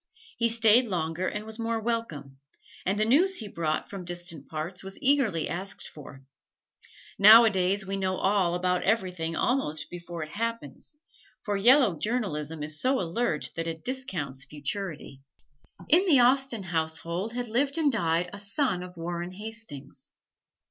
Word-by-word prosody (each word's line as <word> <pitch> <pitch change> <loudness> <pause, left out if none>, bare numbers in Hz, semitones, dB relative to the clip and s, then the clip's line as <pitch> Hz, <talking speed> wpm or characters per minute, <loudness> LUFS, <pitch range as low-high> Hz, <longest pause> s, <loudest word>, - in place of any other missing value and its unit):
He 230 0 +3
stayed 230 +1 +5
longer 175 -1 -2
and 210 +1 -4
was 220 +1 -8
more 230 0 -1
welcome; 165 - -4 0.5
and 195 +2 +1
the 215 - +2
news 345 - +3
he 220 - -4
brought 160 -5 -2
from 195 -2 -7
distant 175 -4 -6
parts 160 +5 -5
was 195 0 -7
eagerly 260 - +3
asked 190 +5 -5
for. 135 -2 -12 1.0
Nowadays 200 -2 +6
we 195 +1 -3
know 190 -1 -1
all 190 -3 +1
about 180 0 0
everything, 180 -6 -1
almost 160 - -1
before 175 -1 -6
it 155 - -8
happens, 230 - -5 0.5
for 205 - -1
yellow 230 - +5
journalism 160 -10 -2
is 155 0 -3
so 260 +1 +2
alert 175 -2 -1
that 165 0 -3
it 160 -1 -6
discounts 170 - -2
futurity. 150 0 -5 0.7
In 360 +5 +4
the 290 -7 +6
Austen 250 -3 +3
household 170 +4 -3
had 245 0 -3
lived 275 +6 0
and 305 -3 +3
died 170 -6 0
a 200 - -7
son 200 -1 -1
of 180 -1 -10
Warren 175 +1 -4
Hastings. 210 -9 -9
190 Hz, 150 wpm, -27 LUFS, 165-230 Hz, 1.0 s, Nowadays